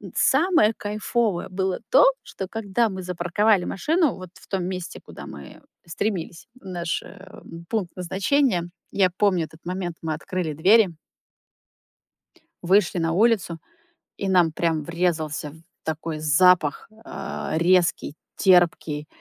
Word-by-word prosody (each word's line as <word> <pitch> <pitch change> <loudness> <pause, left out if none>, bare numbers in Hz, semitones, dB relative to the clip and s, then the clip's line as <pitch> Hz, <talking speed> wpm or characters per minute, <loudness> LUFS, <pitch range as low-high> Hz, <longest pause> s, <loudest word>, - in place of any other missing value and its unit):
Самое 315 - +4
кайфовое 210 -2 -1
было 190 0 -1
то, - - +7 0.2
что, 190 - -7
когда 225 +1 0
мы 190 -2 -6
запарковали 180 +3 +1
машину 315 - +1
вот 185 -1 -10
в - - -17
том 190 -3 -2
месте, 185 -2 -5
куда - - -11
мы 70 -2 -11 0.3
стремились, 175 -1 -4
в - - -20
наш, 175 -3 -3
э, 195 -1 -13 0.3
пункт 200 -6 -2
назначения, 190 +3 +1 0.3
я 190 -2 +3
помню 185 -5 +2
этот 160 0 -16
момент. 180 -1 -4
Мы 160 -1 -1
открыли 175 0 -4
двери 195 +8 +5 1.8
вышли 185 0 +3
на 165 -1 0
улицу, 200 -3 +2 0.6
и 195 - -2
нам 175 -3 +4
прямо 165 -1 0
врезался 160 -3 -2
в - - -15 0.3
такой 160 0 -4
запах, 155 0 +3 0.2
э, - - -4
резкий, 170 -3 +2 0.2
терпкий 165 -5 +3
180 Hz, 130 wpm, -24 LUFS, 165-200 Hz, 1.8 s, то